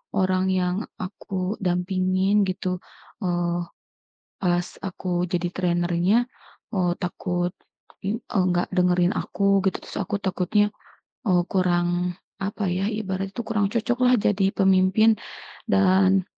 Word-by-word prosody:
orang 185 0 +2
yang 180 -1 +1 0.3
aku 185 +1 -4
dampingin 185 +2 +2
gitu, 185 0 -2 0.5
eee, 175 -1 0 0.8
pas 175 -1 +2 0.2
aku 180 -2 -2
jadi 175 0 0
trainernya, 175 +2 +2 0.6
eee, 180 -2 +2
takut, 175 0 -2 0.5
eee, 210 +3 -1 0.3
nggak 175 0 +1
dengerin 180 0 +3
aku, 200 -1 +1
gitu. - - -6
Terus - - -10
aku 205 - -2
takutnya, 200 +2 +1 0.6
eee, 180 -2 +4
kurang, 175 -1 +1 0.3
apa 200 +1 -2
ya, 185 +2 0
ibaratnya 195 -3 -3
tuh 235 - -3
kurang 210 -3 +1
cocoklah 250 +2 +3
jadi 200 -2 +2
pemimpin 190 +3 +4 0.6
dan 190 -1 +4
185 Hz, 115 wpm, -24 LUFS, 180-195 Hz, 0.8 s, eee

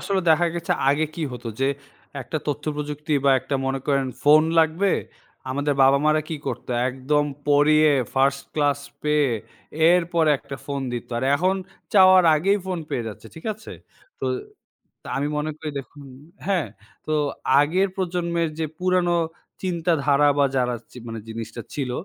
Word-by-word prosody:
আসলে 195 -1 0
দেখা 170 +2 +4
গেছে 170 - -1 0.2
আগে 155 +2 +1
কি 170 - -4
হতো 120 -1 -6
যে, 135 - +3 0.5
একটা 155 - -4
তথ্যপ্রযুক্তি 150 +1 -3
বা 140 - +5
একটা 135 +1 -4
মনে 135 0 -1
করেন 135 -2 +1 0.2
ফোন 150 +2 +7 0.2
লাগবে 165 +5 +3 0.6
আমাদের 145 +2 0
বাবা 135 +1 +6
মারা 155 0 +3
কি 160 - -3
করতো - - -4 0.2
একদম 135 +3 0 0.2
পড়িয়ে 150 +1 +5 0.2
ফার্স্ট 135 +1 +2
ক্লাস 145 -2 +1 0.2
পেয়ে 150 -2 +2 0.6
এরপরে 170 -3 +3
একটা 140 - -8
ফোন 140 -1 -3
দিতো, 120 0 -5
আর 130 - -2
এখন 185 +5 +2 0.4
চাওয়ার 185 -2 +7
আগেই 195 +6 +2
ফোন 185 -2 -2
পেয়ে 115 -2 -2
যাচ্ছে 110 +1 -10
ঠিক 160 - -12
আছে। 215 - -11 0.5
তো - - -1 0.8
তো - - -15
আমি 140 +2 0
মনে 150 +1 -2
করি 155 -1 -5
দেখুন, 140 +2 -10 0.4
হ্যাঁ, 190 -5 0 0.4
তো 155 - 0 0.5
আগের 180 +7 +2
প্রজন্মের 170 -2 -1
যে 160 - 0
পুরানো 180 -1 +2 0.5
চিন্তাধারা 160 -5 +2
বা 140 - +5
যারা 125 -1 +1 0.3
মানে 115 -1 -5
জিনিসটা 115 +1 -6
ছিল, 135 -4 -2
150 Hz, 150 wpm, -23 LUFS, 140-170 Hz, 0.8 s, ফোন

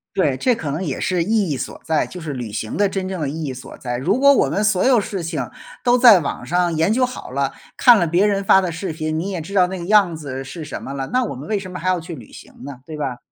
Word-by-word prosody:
对， 145 -8 +2
这 250 -2 +2
可 150 -7 -4
能 165 +6 -3
也 145 -6 -3
是 180 -2 0
意 210 -2 +1
义 140 - 0
所 - - -6
在， 160 -1 +1
就 180 - -9
是 155 -3 -5
旅 120 -4 -5
行 110 +1 -4
的 205 -1 +2
真 190 -1 -3
正 185 -4 -4
的 145 - -1
意 155 +3 -5
义 135 - -3
所 130 - -10
在。 120 -1 -4
如 190 - 0
果 280 0 +7
我 - - +2
们 205 - 0
所 210 -3 +2
有 255 -3 +5
事 195 -3 -4
情 155 -7 -3 0.4
都 245 0 +4
在 235 -7 +8
网 140 - -4
上 175 -1 +1
研 165 +5 +2
究 255 +3 +3
好 250 - -8
了， 140 0 -1 0.2
看 245 -3 +7
了 170 - +1
别 175 +5 +3
人 200 -1 +1
发 190 - +6
的 180 -3 -2
视 165 +2 -4
频， 155 0 -3
你 190 - -3
也 185 -4 -3
知 190 +6 -9
道 185 -3 +4
那 190 +1 -5
个 170 - -6
样 200 -4 +4
子 135 -4 -6
是 155 +4 -8
什 - - -6
么 135 - -6
了， 135 -1 -4
那 255 0 +3
我 220 - -4
们 135 +7 -9
为 210 -2 0
什 185 -1 -8
么 180 - -6
还 185 - -4
要 185 -2 +1
去 165 +1 -8
旅 120 -7 -13
行 - - -13
呢， 135 -2 -8
对 155 -1 -7
吧。 130 -4 -3
175 Hz, 325 characters per minute, -20 LUFS, 145-200 Hz, 0.4 s, 在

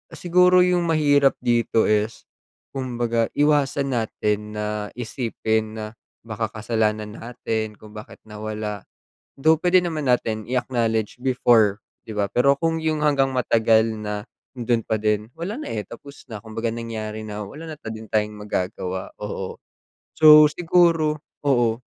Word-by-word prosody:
siguro 180 +1 +4
yung 180 -1 +1
mahirap 145 -3 +3
dito 115 -1 +2
is 105 +1 0 0.5
kumbaga 120 -3 -1
iwasan 145 -2 +2
natin 105 -1 -2
na 105 0 -3
isipin 110 -2 -2
na 110 -1 -5 0.4
baka 110 0 -3
kasalanan 110 -1 -1
natin 110 -2 -4
kung 105 +1 -15
bakit 105 - -11
nawala, 105 -1 -6 0.5
though 160 +3 +5
puwede 180 +2 +4
naman 160 -4 -3
natin 110 -3 0
i-acknowledge 115 -3 -1
before, 115 -5 +3 0.3
'di 110 - -8
ba 100 -1 +1
pero 140 +3 +4
kung 165 0 +1
yong 155 -1 0
hanggang 140 -3 +2
matagal 115 -2 +3
na 105 -1 -4 0.3
andon 120 -2 0
pa 110 - -1
din 105 +1 -1
wala 185 +7 -4
na - - -6
eh, 105 -2 -3
tapos 140 +4 -12
na 105 - -5
kumbaga 110 +1 -4
nangyari 110 -2 -5
na 105 -1 -6
wala 155 +9 -9
na 150 - -8
din 110 0 -8
tayong 105 0 0
magagawa. 95 -2 -4
Oo. 105 -2 -5 0.6
So, 155 -1 +9
siguro, 165 -2 +2 0.2
oo. 120 -4 +2
115 Hz, 140 wpm, -23 LUFS, 110-145 Hz, 0.6 s, So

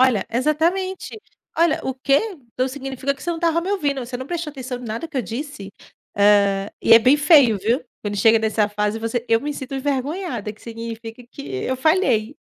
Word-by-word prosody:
Olha, 255 -7 +3
exatamente. 345 - -1 0.4
Olha: 335 -2 +3
"O 265 - -1
quê? 275 +2 +2 0.3
Então 255 +1 0
significa 270 0 -3
que 270 - -15
você 345 - -2
não 335 - -2
estava 335 0 +1
me 360 - -5
ouvindo, 290 -8 0
você 245 +1 -5
não 260 +1 -7
prestou 340 -3 -4
atenção 260 -2 -6
em 245 - -10
nada 230 +9 -5
que 285 - -8
eu 255 - +1
disse?", 225 - -7 0.4
hã, 200 -1 +3
e - - +4
é 230 - +10
bem 260 +5 +5
feio, 290 - +5
viu, 230 +7 0 0.2
quando 205 -1 -4
chega 225 +3 +5
nessa 220 -1 +1
fase, 210 +1 -1
você 230 +1 -2
eu 225 0 +3
me 295 +3 -3
sinto 275 -1 -7
envergonhada, 280 - -2
que 215 - -21
significa 230 0 -7
que 280 - -8 0.2
eu 260 - -1
falhei. 280 - +1
260 Hz, 200 wpm, -21 LUFS, 225-295 Hz, 0.4 s, é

